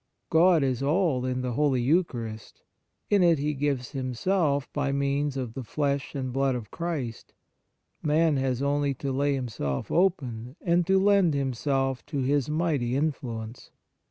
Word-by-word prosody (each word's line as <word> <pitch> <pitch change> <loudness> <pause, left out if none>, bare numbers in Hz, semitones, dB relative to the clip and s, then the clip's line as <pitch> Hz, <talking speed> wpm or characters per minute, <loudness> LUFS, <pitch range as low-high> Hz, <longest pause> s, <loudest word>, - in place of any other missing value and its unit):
God 165 -1 +5
is 130 -2 0
all 145 -3 +1
in 130 0 -1
the 125 - -2
Holy 140 0 +2
Eucharist; 120 -6 -1 0.5
in 205 -2 +5
it 170 -2 +5
He 150 +2 -1
gives 135 -3 -2
Himself 140 +3 0
by 145 -1 0
means 140 0 0
of 125 -4 -4
the 130 - -5
Flesh 140 +3 -2
and 130 -2 -3
Blood 135 -1 +1
of 115 -4 -6
Christ; 155 -9 -4 0.7
man 155 +1 +2
has 130 -1 -1
only 140 -1 +1
to 135 +2 -3
lay 140 +2 +1
himself 105 - -3
open 130 -9 0
and 175 0 +1
to 190 0 +4
lend 195 -5 +4
him 135 -2 -1
self 135 +1 -1
to 150 - -4
His 140 +1 +1
mighty 150 -6 0
influence. 125 -6 -3
140 Hz, 155 wpm, -27 LUFS, 125-155 Hz, 0.7 s, God